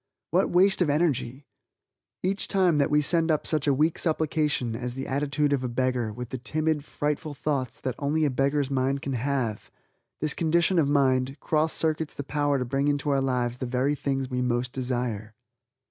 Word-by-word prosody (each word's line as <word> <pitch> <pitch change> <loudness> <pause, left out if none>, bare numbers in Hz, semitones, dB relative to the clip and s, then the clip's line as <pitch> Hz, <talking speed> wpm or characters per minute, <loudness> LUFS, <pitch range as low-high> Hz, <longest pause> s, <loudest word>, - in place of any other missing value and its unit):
What - - +2
waste 190 +2 +4
of 170 - +3
energy. 145 -4 0 0.8
Each 195 +2 0
time 185 -5 +3
that 140 -1 +2
we 150 0 +3
send 165 +2 +2
up 155 -2 +1
such 155 -2 0
a - - +5
weak 155 +4 +1
supplication 150 -6 0
as 125 +1 -4
the 135 - -4
attitude 145 +1 0
of 135 -2 0
a - - -1
beggar, 125 -2 -1
with 125 +2 -7
the 130 - -5
timid, 155 +3 -1
frightful 150 0 -3
thoughts 135 -4 -2
that 130 - -2
only 150 +2 +1
a 145 - +1
beggar's 140 +1 0
mind 135 +1 0
can 140 - -3
have 125 -4 -2 0.5
this 155 -1 +1
condition 170 +2 +2
of 145 -3 +2
mind, 135 -1 +2
cross 155 +2 +1
circuits 160 -1 0
the 145 - -4
power 145 0 0
to 125 - -2
bring 135 +3 0
into 145 0 0
our 135 -1 +2
lives 125 -2 -1
the 130 - -4
very 130 +3 +1
things 135 -2 -2
we 125 -1 -2
most 125 0 -1
desire. 120 -4 -3
140 Hz, 190 wpm, -26 LUFS, 130-150 Hz, 0.8 s, a